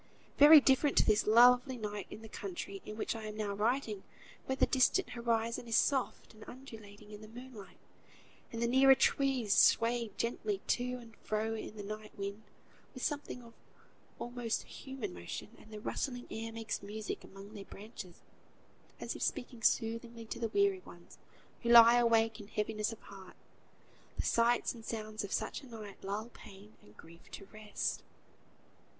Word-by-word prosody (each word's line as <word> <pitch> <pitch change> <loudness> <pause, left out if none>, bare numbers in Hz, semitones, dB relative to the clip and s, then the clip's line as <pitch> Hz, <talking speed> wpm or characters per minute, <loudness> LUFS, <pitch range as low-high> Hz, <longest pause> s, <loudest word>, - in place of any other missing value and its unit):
Very 300 +2 +11
different 275 +1 +3
to - - +6
this 210 -1 +3
lovely 245 +3 +6
night 210 -3 -5
in 220 - -10
the - - -8
country 200 -1 -6
in 215 - -7
which 225 - -2
I 220 -1 -6
am 215 0 -6
now 210 -2 -2
writing, 215 0 0 0.5
where 265 - 0
the - - +4
distant 265 +8 +2
horizon 235 0 -1
is 230 - +2
soft 265 -4 0
and 215 0 -13
undulating 215 -5 -12
in 210 0 -10
the 215 - -11
moonlight, 235 -2 -11 0.7
and 230 0 -3
the - - +2
nearer 265 +2 +6
trees 265 -7 +2
sway 230 0 +4
gently 215 -3 -2
to 250 0 +1
and 230 -2 -13
fro 215 +1 -2
in 220 -1 -6
the 205 - -6
night 215 +1 -8
wind 200 +1 -5 0.5
with 255 - -7
something 285 -4 -3
of 230 0 -14 0.6
almost 240 -2 -3
human 265 - -7
motion; 85 - -7
and 220 - -17
the 215 - -7
rustling 245 +3 -3
air 225 +1 -5
makes 225 -1 -4
music 210 +1 -6
among 195 +2 -12
their 205 -2 -8
branches, 200 -3 -11 0.8
as - - -4
if - - -8
speaking 245 -4 -3
soothingly 230 0 0
to 220 - -6
the 230 -1 -1
weary 400 - +2
ones - - -15 0.4
who 235 - -2
lie 235 0 +9
awake 225 -1 +3
in 205 - -10
heaviness 215 +1 -2
of 225 - -10
heart. 190 -2 -12 0.8
The - - -1
sights 235 +1 +2
and 230 -2 -12
sounds 215 -1 -4
of 200 - -6
such - - -2
a 270 - -13
night 215 -4 -10
lull 205 +4 -4
pain 205 -2 -14
and 105 - -20
grief 170 +1 -16
to 195 - -8
rest. 215 -1 -3
225 Hz, 170 wpm, -33 LUFS, 210-245 Hz, 0.8 s, Very